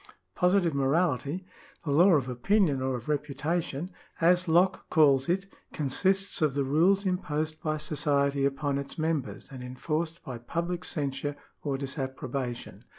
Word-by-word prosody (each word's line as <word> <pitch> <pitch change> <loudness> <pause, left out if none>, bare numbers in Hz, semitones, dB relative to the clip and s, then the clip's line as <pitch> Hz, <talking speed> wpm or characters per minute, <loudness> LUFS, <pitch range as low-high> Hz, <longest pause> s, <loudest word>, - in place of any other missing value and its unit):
Positive 180 -2 +2
morality 145 +3 0 0.2
— - - -27
the 145 - -1
law 175 +6 +6
of 140 -5 +2
opinion 140 - +2
or 130 0 0
of 120 -1 -7
reputation, 150 +3 -2 0.3
as 180 +2 +4
Locke 175 +4 +2
calls 140 -4 +4
it 190 +2 +1 0.2
— - - -31
consists 190 +7 +1
of 150 -4 +2
the 140 - +1
rules 175 +9 +3
imposed 155 -4 -2
by 155 -1 -1
society 140 -2 +1
upon 140 0 0
it 140 - -5
^ - - -12
members 155 -4 -2
and 130 -2 -8
enforced 155 +6 -3
by 125 -4 -6
public 170 +8 -3
censure 145 -2 -3 0.3
or 140 -2 -2
disapprobation. 130 -2 -4
150 Hz, 150 wpm, -28 LUFS, 135-170 Hz, 0.3 s, law